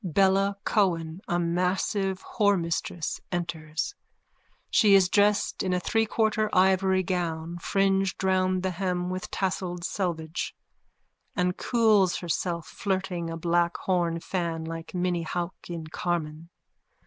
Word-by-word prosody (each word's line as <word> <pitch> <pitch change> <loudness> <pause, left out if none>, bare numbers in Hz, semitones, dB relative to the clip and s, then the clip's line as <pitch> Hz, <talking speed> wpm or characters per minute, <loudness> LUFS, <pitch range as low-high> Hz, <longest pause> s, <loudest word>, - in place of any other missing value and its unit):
Bella 195 +2 +2
Cohen, 170 -4 +1
a 175 - +1
massive 185 +3 0
whoremistress, 175 -5 0
enters. 170 - -3 0.8
She 205 -2 +6
is 190 -2 +6
dressed 205 +1 +2
in 185 -1 0
a - - +1
threequarter 220 +1 +1
ivory 190 0 +4
gown, 170 -1 -2
fringed 195 +1 +1
round 185 -1 +2
the 190 - 0
hem 180 0 -2
with 185 0 -4
tasselled 180 -2 -2
selvedge, 170 -3 -3 0.8
and 180 -1 +1
cools 215 -6 +3
herself 170 -1 -2
flirting 185 -3 -2
a 165 - -4
black 170 +1 +1
horn 170 -3 0
fan 165 -2 -2
like 165 +2 -7
Minnie 175 -1 0
Hauck 175 +2 -3
in_ 165 -2 -6
Carmen. 165 -2 -3
180 Hz, 120 wpm, -27 LUFS, 170-190 Hz, 0.8 s, She